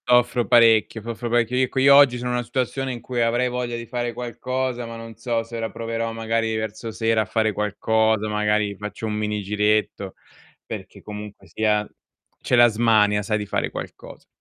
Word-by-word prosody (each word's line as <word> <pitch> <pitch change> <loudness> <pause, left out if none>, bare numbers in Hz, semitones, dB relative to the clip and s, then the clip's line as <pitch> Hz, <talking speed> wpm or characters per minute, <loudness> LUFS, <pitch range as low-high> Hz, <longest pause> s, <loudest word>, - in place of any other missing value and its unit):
Soffro 120 -1 +3
parecchio, 115 -2 +4
soffro 115 +2 -5
parecchio. 120 +1 +1
Io 130 0 +2
co 135 - -2
io 140 +1 +7
oggi 140 -3 +6
sono 125 0 -3
una 125 0 -1
situazione 130 +2 -2
in 120 -2 -6
cui 125 0 -3
avrei 120 +2 +1
voglia 125 -1 -3
di 115 - -6
fare 120 0 -3
qualcosa, 125 +1 -3
ma 115 0 -8
non 115 0 -10
so 115 0 -2
se 115 +1 -10
ora 115 0 -3
proverò 115 0 -3
magari 115 0 -1
verso 110 +1 -4
sera 115 0 +1
a - - -2
fare 110 -2 0
qualcosa, 110 +1 +1
magari 105 -1 0
faccio 105 +2 -6
un 110 - -2
mini 105 0 -2
giretto, 105 -1 0 0.5
perché - - -8
comunque 105 -1 -9
sia 105 -1 0 0.5
c'è - - +1
la 120 0 +7
smania 105 -2 +3
sai 105 +1 -1
di 105 - -4
fare 100 - -2
qualcosa. - - -9
115 Hz, 185 wpm, -23 LUFS, 105-120 Hz, 0.5 s, io